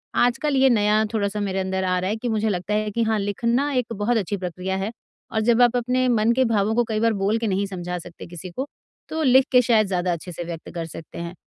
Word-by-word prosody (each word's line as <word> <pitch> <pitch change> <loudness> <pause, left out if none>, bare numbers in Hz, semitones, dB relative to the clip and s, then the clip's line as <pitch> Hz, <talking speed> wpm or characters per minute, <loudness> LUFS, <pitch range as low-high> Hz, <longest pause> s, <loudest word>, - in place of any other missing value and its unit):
आजकल 265 +4 +2
ये 265 0 +5
नया 215 -2 +3
थोड़ा-सा 210 -1 -1
मेरे 195 -2 -1
अंदर 190 0 -1
आ 185 0 +1
रहा 185 +1 -2
है 210 - 0
कि 225 +2 -5
मुझे 220 -1 0
लगता 185 +1 -2
है 215 0 0
कि 230 +3 0
हाँ, 220 -1 +1
लिखना 235 +8 0
एक 250 -3 -1
बहुत 225 +3 0
अच्छी 205 -1 -1
प्रक्रिया 185 +1 -4
है 195 +3 -2 0.4
और 220 - 0
जब 235 +2 +3
आप 245 0 +5
अपने 250 +1 +1
मन 230 -1 +3
के 260 +1 +2
भावों 220 -1 +1
को 240 - +3
कई 215 -1 -1
बार 230 0 +2
बोल 205 +3 +2
के 230 - -1
नहीं 200 0 0
समझा 180 -2 -4
सकते 170 0 -11
किसी 175 +1 -8
को 260 +10 -4 0.4
तो 320 - -2
लिख 260 -1 +5
के 250 -1 +6
शायद 225 -4 +3
ज़्यादा 180 -1 0
अच्छे 170 +2 -7
से 175 - -5
व्यक्त 165 -1 -7
कर 165 -1 -3
सकते 165 0 -10
हैं। 170 0 -5
215 Hz, 255 wpm, -23 LUFS, 185-235 Hz, 0.4 s, के